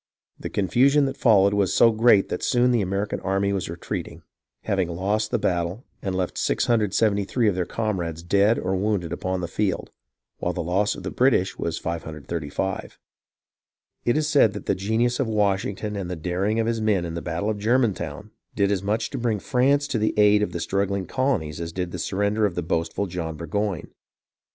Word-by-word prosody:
The - - -5
confusion 135 - +3
that 135 0 -2
followed 100 -6 +4
was 100 -2 +1
so 115 - +6
great 110 -2 +4
that - - -3
soon 125 0 +3
the 120 -3 +2
American 100 +2 -2
army 100 +1 0
was 95 -4 -2
retreating, 85 0 -6 0.4
having 95 -3 0
lost 100 +5 -1
the - - +1
battle, 90 +6 -1 0.2
and 95 -2 -2
left 90 -1 -2
673 110 0 +1
of 105 - +3
their 90 -1 -1
comrades 85 -7 -3
dead 100 +5 +3
or 95 - -1
wounded 95 -4 -1
upon 95 0 -2
the 85 - -3
field, 95 +1 -2 0.5
while 90 - -1
the 85 - -3
loss 95 +5 +1
of - - -9
the 90 - -4
British 120 -7 +2
was 85 -1 -2
535. 80 +2 -4 1.1
It 120 +5 +2
is 155 -1 +1
said 140 -9 +4
that 105 - -7
the - - +2
genius 110 +5 0
of 135 - +1
Washington 105 0 0
and 95 -3 -4
the 90 - -3
daring 95 +6 -1
of 115 - +1
his 115 -1 -1
men 105 -5 +1
in 85 - -5
the 85 - -4
battle 90 +5 -2
of 105 - -4
Germantown 105 - 0 0.2
did 100 -3 +2
as 100 -3 0
much 110 +3 -1
to 135 - -4
bring 115 -3 0
France 140 +5 +2
to 115 - 0
the 110 - 0
aid 105 0 +5
of 105 - -1
the 85 - -4
struggling 100 +1 -1
colonies 90 - -1
as 85 0 -4
did 90 0 -3
the 90 - -5
surrender 105 +4 +1
of 90 - -7
the 90 - -2
boastful 85 +4 -1
John 85 -4 -5
Burgoyne. 90 +3 -3
100 Hz, 195 wpm, -24 LUFS, 90-110 Hz, 1.1 s, so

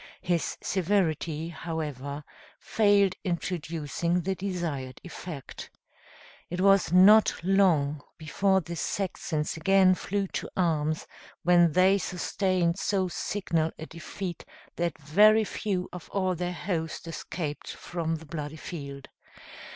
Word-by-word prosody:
His 175 -3 0
severity, 170 -4 0
however, 150 -4 -5 0.4
failed 205 -3 +3
in 175 -2 0
producing 170 0 -2
the 190 +3 -1
desired 170 -9 -4
effect. 170 -5 -8 0.8
It 175 - -4
was 195 -3 +4
not 205 +5 +7
long 170 -7 +3 0.2
before 190 +5 +1
the 170 0 -6
Saxons 160 -3 -2
again 190 +3 +5
flew 200 +2 -2
to - - -4
arms, 155 -3 +1 0.4
when 175 -2 +5
they 190 +3 +5
sustained 180 -1 0
so 190 -3 0
signal 170 -4 -1
a 160 - -7
defeat 170 +2 -6 0.3
that 170 -1 -1
very 210 +9 +5
few 195 -3 -2
of 180 -2 -9
all 185 -2 0
their 180 +1 -2
host 170 -3 -3
escaped 155 -2 -5
from 165 -2 -3
the 160 0 -9
bloody 150 -1 -5
field. 140 -4 -7
175 Hz, 120 wpm, -28 LUFS, 155-190 Hz, 0.8 s, not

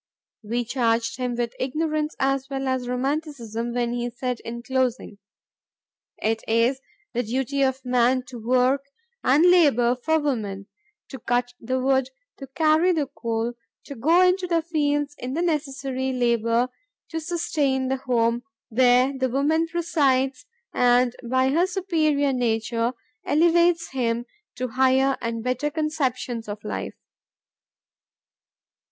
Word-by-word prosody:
We 235 +2 -2
charged 230 -2 0
him 250 -1 -2
with 235 -1 -2
ignorance 305 +3 -1
as 270 0 0
well 270 -1 -3
as 260 -1 -1
romanticism 250 -4 -3
when 240 0 -1
he 240 0 -2
said 245 0 -4
in 235 +1 -7
closing, 255 -5 -1 1.0
"It 220 +1 -1
is 235 +4 +2 0.3
the 245 - +1
duty 265 +4 -2
of 265 -1 0
man 250 +1 +2
to 245 -2 -8
work 255 +4 +2 0.4
and 290 +6 +4
labor 255 -9 +4
for 315 +6 +1
woman; 215 -10 -2 0.4
to 265 - -8
cut 245 +1 -1
the 255 +3 -2
wood, 265 0 +2 0.3
to 270 - -9
carry 315 +5 +3
the 305 -4 0
coal, 230 0 -2 0.3
to 280 - -7
go 315 +8 +3
into 365 0 +2
the 335 -2 +1
fields 290 -3 0
in 255 +2 -4
the 335 - 0
necessary 275 -5 -2
labor 235 0 +1 0.4
to 325 - -2
sustain 300 -5 -1
the 265 +1 0
home 235 -2 +1 0.3
where 250 +3 +4
the 260 -1 0
woman 300 +6 +1
presides 280 -6 0 0.3
and 245 0 +3
by 260 +1 +3
her 335 +6 +2
superior 315 -7 +1
nature 230 0 0 0.3
elevates 340 +2 +3
him 240 -2 -1 0.3
to 255 0 -3
higher 265 +2 +3
and 230 -1 -3
better 255 +4 -1
conceptions 265 -7 -2
of 205 0 -6
life." 210 - -4
260 Hz, 135 wpm, -24 LUFS, 240-290 Hz, 1.0 s, and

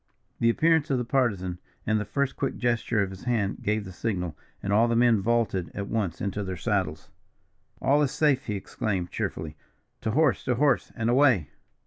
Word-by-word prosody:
The 115 - +4
appearance 160 +4 +3
of 135 - +2
the 125 - -2
Partisan, 100 -9 0 0.3
and 110 0 +2
the 105 - -3
first 140 +6 -1
quick 135 - -2
gesture 120 -3 +1
of 95 - -4
his 95 +3 -10
hand, 110 -5 0
gave 105 0 0
the 95 - -8
signal; 90 -5 -3 0.3
and 100 - 0
all 115 +3 +5
the 115 - +1
men 115 -3 +4
vaulted 110 -5 0
at 100 0 -4
once 105 -7 -1
into 100 +1 -2
their 95 -1 -4
saddles. - - -2 0.7
"All 145 +2 +4
is 145 - +2
safe!" 145 -2 +1
he 105 - -1
exclaimed, 95 -2 -3
cheerfully. 80 -1 -4 0.4
"To - - -2
horse, 145 +4 +2
to 125 - +1
horse, 140 0 +2
and 115 - -1
away!" 120 - +4
110 Hz, 190 wpm, -27 LUFS, 95-125 Hz, 0.7 s, all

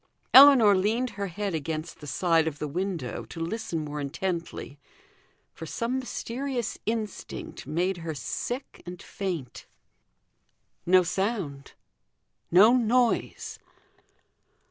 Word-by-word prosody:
Ellinor 260 -7 +9
leaned 225 +6 0
her 200 0 -4
head 195 +2 -3
against 155 +1 -4
the 150 - -10
side 165 +3 +2
of 150 -2 -3
the 150 - -3
window 170 -7 -3
to 115 - -10
listen 165 -2 -3
more 150 0 -5
intently, 165 0 -4 0.7
for 160 - -8
some 240 +8 -2
mysterious 255 -1 -4
instinct 220 - -5
made 175 +5 0
her 165 -2 -5
sick 245 - -5
and 180 0 -7
faint. 180 -11 -5 1.2
No 185 +1 +6
sound 175 -6 -3 0.8
no 210 +8 +7
noise. 255 - +1
185 Hz, 110 wpm, -27 LUFS, 160-230 Hz, 1.2 s, Ellinor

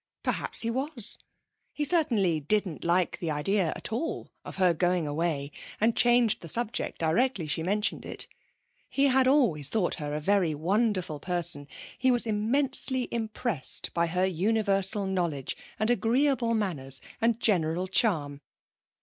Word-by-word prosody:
Perhaps - - +1
he 230 - +1
was. 265 -2 +2 0.5
He 295 - -1
certainly 230 - +1
didn't 180 +2 -2
like 175 +1 0
the 170 - -3
idea 170 +5 0
at - - -2
all 325 +9 -4
of - - -8
her 185 -2 +3
going 175 -1 0
away 145 -2 -2 0.3
and 225 +2 +2
changed 240 -2 +3
the 170 - -9
subject 230 +6 0
directly 190 +4 0
she 155 +2 -1
mentioned 205 +5 -1
it. - - -6 0.6
He 275 - 0
had 260 0 +3
always 215 - +2
thought 205 -6 0
her 145 0 -4
a - - -2
very 180 -1 +1
wonderful 185 -1 -1
person. 175 -3 0 0.3
He 260 - +2
was 245 -1 +4
immensely 255 +4 +1
impressed 220 - 0
by 170 0 +1
her 180 +3 0
universal 195 +2 0
knowledge 170 -8 -2 0.2
and 215 +3 +1
agreeable 240 +1 +1
manners 140 - -2 0.2
and 230 0 +1
general 180 -4 0
charm. 155 -8 +1
195 Hz, 145 wpm, -27 LUFS, 165-235 Hz, 0.6 s, was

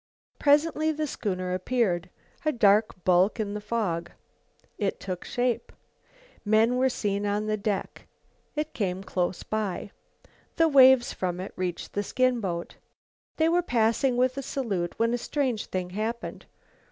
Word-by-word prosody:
Presently 310 +2 +3
the 310 0 -2
schooner 185 -9 -3
appeared, 185 -3 0 0.3
a 310 - +2
dark 210 - +3
bulk 185 +5 +3
in 205 -2 -2
the 210 - -4
fog. 205 -6 -2 0.7
It 200 -3 -1
took 185 -2 -5
shape. 245 -1 -1 0.7
Men 220 +3 +3
were 260 +1 +3
seen 205 -4 -1
on 205 +1 0
the 215 0 0
deck. 205 -1 -3 0.5
It 300 +1 -2
came 185 -4 -1
in 190 - -8
close 180 -2 -2
by. 205 -2 -3 0.6
The 330 -1 +4
waves 265 -4 +6
from 180 -1 -3
it 185 - -6
reached 180 -2 -4
the 205 - 0
skin 255 +4 +1
boat. 170 -4 -4 0.6
They 320 - +3
were 345 +2 +3
passing 240 -2 +1
with 255 +2 +2
a - - -2
salute, 205 -11 -3
when 230 +1 +2
a 245 - 0
strange 255 -5 -1
thing 180 -1 -3
happened. 220 +4 -4
215 Hz, 155 wpm, -27 LUFS, 190-255 Hz, 0.7 s, waves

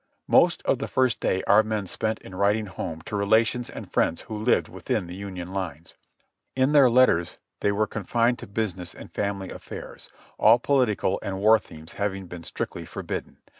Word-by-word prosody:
Most - - +4
of - - +2
the - - -3
first 130 -2 +1
day 95 - 0
our 100 +2 +6
men 110 -2 -2
spent 110 +4 -2
in 95 - -12
writing 100 +3 +1
home 80 -4 -6
to 105 - -5
relations 110 +4 +2
and - - -9
friends 85 - +1
who 110 - -7
lived 125 - +3
within - - -3
the 85 - -8
Union 95 -2 -7
lines. 85 -4 -5 0.6
In 130 +2 +3
their 140 -4 +7
letters 115 -9 +3 0.2
they 100 - +2
were 105 +2 +1
confined 115 +4 0
to - - -9
business 95 -4 -3
and - - -11
family 100 -2 -3
affairs, - - -9 0.3
all 110 +2 +7
political 120 -7 +1
and 95 -1 -4
war 110 +2 +6
themes 80 -3 -13
having 95 -2 -1
been 90 -1 -9
strictly - - -5
forbidden. - - -6
100 Hz, 180 wpm, -25 LUFS, 95-115 Hz, 0.6 s, their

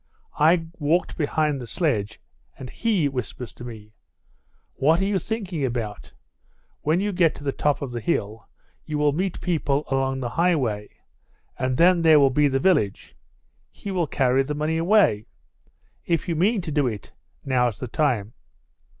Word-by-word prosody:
I 165 +2 +4
walked 160 +4 +1
behind 150 -2 0
the 120 - -7
sledge 110 - -1 0.4
and 130 -2 -8
he 210 -10 +1
whispers 125 -3 -5
to - - -11
me, 110 -3 -10 0.8
'What 155 +5 +2
are - - +1
you 200 -1 +1
thinking 190 -6 -4
about? 115 -5 -4 0.7
When 155 +4 +1
you 205 +1 -1
get 175 -4 +2
to - - -11
the 140 - 0
top 145 +1 0
of 135 - -5
the 120 - -4
hill 110 -6 -2 0.3
you 155 -1 -4
will 150 0 +3
meet 185 +5 -2
people 150 -5 0
along 135 0 0
the 125 -2 -3
highway, 130 -10 0 0.7
and 130 -1 -1
then 175 0 +5
there 160 -2 +6
will 135 -2 +4
be 145 +2 +3
the 135 -1 +1
village. 130 - +1 0.5
He 200 - -8
will 175 -4 0
carry 130 -1 +2
the 150 +2 -3
money 155 +2 -1
away. 165 - +3 0.8
If 165 -3 0
you 170 - -1
mean 200 +6 +2
to 165 -3 -6
do 145 -3 +1
it, 105 -5 -6 0.3
now's 125 -5 +1
the 125 - -5
time. 115 -6 0
145 Hz, 165 wpm, -24 LUFS, 125-170 Hz, 0.8 s, there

